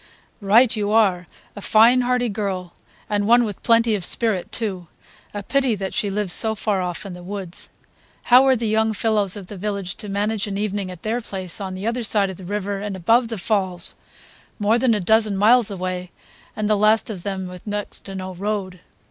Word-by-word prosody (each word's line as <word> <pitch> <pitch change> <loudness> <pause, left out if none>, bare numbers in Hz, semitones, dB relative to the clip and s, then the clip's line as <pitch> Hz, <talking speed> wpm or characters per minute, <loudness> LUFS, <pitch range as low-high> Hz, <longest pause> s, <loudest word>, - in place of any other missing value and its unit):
"Right 225 +5 +4
you 205 -1 -1
are! 190 -5 +2 0.3
A 205 - -8
fine 230 +5 +5
hearty 250 0 +1
girl, 195 -4 -4 0.3
and 205 -1 0
one 240 +1 +6
with 210 -4 -5
plenty 230 -1 +3
of 200 -4 -1
spirit 205 -1 0
too. 190 -7 -2 0.4
A 205 0 -6
pity 265 +1 +1
that 195 -1 -5
she 205 - 0
lives 200 -2 -1
so 220 -1 +2
far 205 -2 -1
off 180 +2 -4
in 195 - -7
the 180 - -10
woods. 185 -1 -7 0.5
How 250 +2 +6
are 265 - +5
the 230 -1 -2
young 220 +1 +1
fellows 210 -2 0
of 200 -2 -8
the 200 +2 -9
village 200 -1 -4
to 210 - -7
manage 205 +1 -1
an 195 -1 -4
evening 205 -2 -2
at 180 -1 -10
their 230 +3 -1
place, 190 -3 -4
on 190 -1 -4
the 190 +2 -6
other 235 +2 -1
side 205 -3 +2
of 185 - -10
the 190 - -11
river 200 +1 -3
and 205 -1 -4
above 230 +7 +3
the 225 -1 -5
falls, 185 -3 0 0.6
more 215 +2 +2
than 240 -2 +3
a - - -1
dozen 215 +1 +2
miles 225 +3 +4
away 185 -2 -4 0.5
and 215 -1 -2
the 215 - +3
last 215 +2 +3
of 190 -5 -7
them 190 0 -4
with 180 +2 -10
next 205 0 -4
to 195 - -7
no 185 0 -5
road?" 190 -1 -4
205 Hz, 210 wpm, -22 LUFS, 190-220 Hz, 0.6 s, one